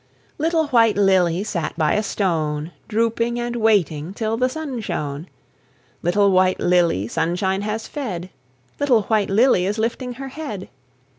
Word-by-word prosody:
Little 325 +1 +2
White 230 -5 +4
Lily 190 -2 +3
Sat 170 -8 -3
by 155 -2 +2
a 210 - +2
stone, 160 -6 -1 0.2
Drooping 230 +2 0
and 240 0 -3
waiting 190 -7 +1
Till 220 0 -1
the 255 +2 +1
sun 290 -4 -5
shone. 150 -4 -4 0.7
Little 200 +3 +3
White 185 0 +3
Lily 170 - +2
Sunshine 190 - -1
has 215 +2 -3
fed; 190 - -5 0.5
Little 250 -7 +3
White 215 -1 +1
Lily 200 -3 +3
Is 205 +2 -1
lifting 240 +3 -2
her 270 +2 -7
head. 260 -10 -6
205 Hz, 145 wpm, -21 LUFS, 175-235 Hz, 0.7 s, White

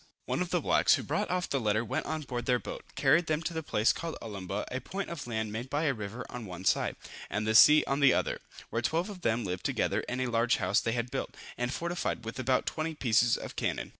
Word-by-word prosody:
One - - -1
of - - -1
the - - +1
blacks, - - +4
who - - -4
brought - - -1
off 180 0 0
the 135 - 0
letter 110 0 +1
went - - -2
on 155 0 -2
board 120 -3 -4
their 125 - +4
boat, - - -7
carried 155 +5 +4
them 155 +1 0
to 170 - -3
the 160 - -2
place 110 -7 +2
called 165 -1 -5
Olumbah, 100 -5 -4
a 130 +1 -3
point 195 -1 -5
of 145 -6 -6
land 110 -2 -2
made 115 +4 -5
by 145 +3 0
a 150 -4 +2
river 110 +2 -6
on 120 -3 -7
one 90 +1 -8
side, - - +2 0.3
and 105 +1 -1
the 110 - +1
sea 150 +7 +8
on 135 +1 0
the 140 -2 +6
other, - - 0 0.3
where 115 - 0
twelve 170 - 0
of 185 -3 -10
them 115 -5 0
lived 90 -1 -3
together - - 0
in 125 - -2
a 130 - +1
large 120 0 +2
house 100 +1 +2
they 115 - -1
had 120 0 -2
built, 135 - -4 0.2
and 120 0 -2
fortified 170 -7 -2
with 115 +3 -6
about 130 0 +1
twenty 155 0 -2
pieces 120 -3 +3
of - - -8
cannon. - - -2
125 Hz, 255 wpm, -30 LUFS, 110-155 Hz, 0.3 s, sea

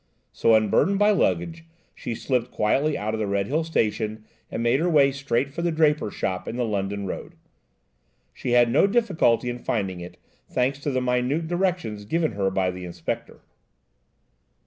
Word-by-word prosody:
So, 115 - +3
unburthened 110 - +3
by 205 +1 +4
luggage, 170 -4 0 0.3
she 115 - -5
slipped 125 0 -1
quietly 140 +9 +1
out 110 +1 -3
of 110 - -2
the 105 - -1
Redhill 100 +11 0
Station 110 -7 -1 0.2
and 115 - -3
made 120 +3 +3
her 175 +2 +1
way 140 -4 +5
straight 135 -1 -1
for 170 - -4
the 170 0 +1
draper's 150 -7 +1
shop 95 -1 -2
in - - -4
the 125 -1 0
London 100 -1 -2
Road. 95 - -6 1.0
She 120 - -3
had 120 -1 +5
no 145 +10 +5
difficulty 195 - +2
in 120 0 -3
finding 95 -7 -2
it, 90 0 -9 0.3
thanks 130 +3 0
to 145 - -3
the 130 -2 0
minute 125 +6 0
directions 175 - -1
given 160 +5 0
her 100 -2 0
by 95 -1 0
the 90 0 -8
Inspector. 85 -1 -5
125 Hz, 170 wpm, -24 LUFS, 105-155 Hz, 1.0 s, way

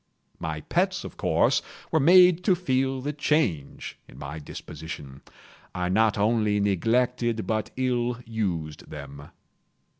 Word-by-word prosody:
My 80 -1 -4
pets, - - 0
of - - -8
course, - - +2 0.3
were 160 - +3
made 180 +3 +6
to 190 - +5
feel 135 -6 0
the 145 +3 -3
change 145 - -1
in - - -15
my 70 +3 -6
disposition. 75 -2 -9 0.5
I 90 0 -1
not 110 +3 +3
only 105 -1 +2
neglected, 115 +3 +1
but 110 -1 -1
ill 125 -1 0
used 90 -10 -3
them. 70 +1 -9
110 Hz, 125 wpm, -26 LUFS, 80-130 Hz, 0.5 s, made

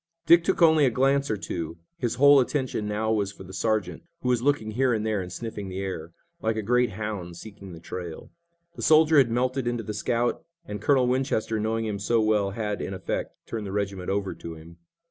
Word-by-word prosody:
Dick 170 0 +7
took 190 -1 +2
only 160 -2 +6
a 135 - +5
glance 135 +3 +2
or 110 - 0
two. 85 -4 -5 0.2
His 120 -3 -1
whole 140 +2 +7
attention 130 -5 -1
now 110 +1 -1
was 100 -3 0
for 100 - -12
the 95 0 -11
sergeant, 95 -3 -1 0.2
who 125 - -1
was 125 -2 +2
looking 130 -5 +1
here 125 +2 +2
and 110 0 -2
there 110 -3 0
and 90 -1 -7
sniffing 105 0 -6
the 95 - -6
air, 85 -4 -5 0.3
like 110 0 0
a 110 - -2
great 125 0 +2
hound 95 -5 -5
seeking 100 -1 -10
the 85 - -10
trail. 85 0 -7 0.4
The - - -8
soldier 155 -1 +6
had 130 -4 +4
melted 125 +2 0
into 120 -1 -1
the 105 - -5
scout, 120 +5 -1 0.2
and 105 -9 -6
Colonel 130 +1 +3
Winchester, 125 -3 0
knowing 110 +1 -1
him 105 -2 -3
so 115 +3 +1
well, 110 -2 +2
had, 105 0 -3
in 95 - -4
effect, - - -4
turned 110 -3 -5
the - - -5
regiment 100 -2 -3
over 100 0 -1
to 85 -1 -8
him. 80 +2 -13
110 Hz, 220 wpm, -26 LUFS, 100-125 Hz, 0.4 s, Dick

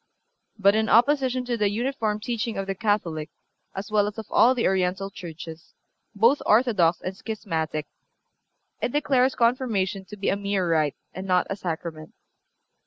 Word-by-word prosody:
But, 200 -1 +5
in 220 +1 +1
opposition 255 +1 +3
to 245 -1 -1
the 210 -2 +2
uniform 225 -1 -1
teaching 230 0 -3
of 195 - -2
the 195 - -2
Catholic, 180 -7 -1 0.5
as 195 +2 -6
well 205 -1 +3
as 210 +2 -6
of 220 - -5
all 250 +3 +5
the 235 - 0
Oriental 190 +1 0
churches, 165 -2 -9 0.4
both 230 +8 +4
orthodox 210 -8 +3
and 185 +1 -4
schismatic, 160 -8 -3 1.0
it - - 0
declares 270 -3 +2
Confirmation 230 -6 +1
to 210 +3 -10
be 200 - -1
a - - +2
mere 200 -2 -1
rite 155 -3 +1 0.2
and 190 +1 -6
not 180 -1 +3
a - - 0
Sacrament. 165 -4 -6
200 Hz, 160 wpm, -25 LUFS, 180-235 Hz, 1.0 s, But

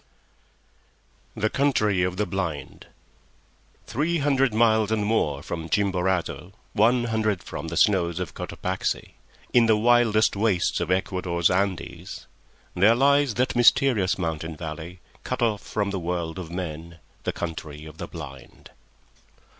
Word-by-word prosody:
THE 110 0 0
COUNTRY 110 -9 +2
OF 90 0 -1
THE 105 - +1
BLIND 90 -6 -4 1.0
Three 160 +7 0
hundred 135 -3 +2
miles 110 -1 +3
and 105 -2 +1
more 75 -10 0
from 80 -1 -5
Chimborazo, 95 -1 0 0.2
one 120 +3 +3
hundred 110 -4 0
from - - -6
the - - -4
snows 90 -4 +3
of 90 - -4
Cotopaxi, 95 +1 -3 0.4
in 120 -2 +5
the 110 -1 +4
wildest 115 -2 +3
wastes 100 -3 +1
of 85 -1 -2
Ecuador's 90 -2 +1
Andes, 95 -2 -2 0.5
there 105 +6 +5
lies 140 -1 +3
that 125 +1 0
mysterious 120 -5 +4
mountain 80 -1 -3
valley, 85 +2 -7 0.2
cut 130 -1 -2
off 110 -3 +1
from 105 -2 -2
all - - -3
the 95 - -2
world 85 0 -3
of 85 -3 -7
men, 85 -1 -6 0.3
the - - -1
Country 80 -3 -6
of 80 0 -12
the - - -5
Blind. 70 -6 -11
95 Hz, 140 wpm, -25 LUFS, 85-110 Hz, 1.0 s, in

